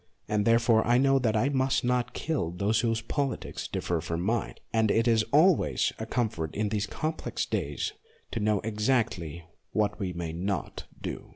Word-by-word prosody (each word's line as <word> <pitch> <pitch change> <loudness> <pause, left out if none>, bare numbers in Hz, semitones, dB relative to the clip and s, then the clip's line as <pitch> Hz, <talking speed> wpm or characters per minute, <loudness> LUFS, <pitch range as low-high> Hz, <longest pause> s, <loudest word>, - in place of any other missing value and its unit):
And 105 -1 +1
therefore 115 -1 +4
I 120 +1 +5
know 135 +1 +4
that 115 -4 +1
I 125 +6 +2
must 135 -1 +1
not 125 0 0
kill 150 - -1
those 100 +5 +1
whose 115 0 +1
politics 135 +4 -3
differ 85 -2 -2
from 85 0 -3
mine; 110 +5 -1 0.2
and 110 -1 +3
it 115 +3 +2
is 115 -1 +4
always 160 +4 +4
a 110 - -4
comfort 105 -11 -2
in 105 0 0
these 105 -1 -1
complex 155 +8 -3
days - - -2 0.4
to 115 - -2
know 105 -1 +1
exactly 105 - -1 0.3
what 105 0 0
we 95 -3 -2
may 85 -2 -4
not 90 -1 -3
do. - - -6
110 Hz, 175 wpm, -28 LUFS, 100-125 Hz, 0.4 s, I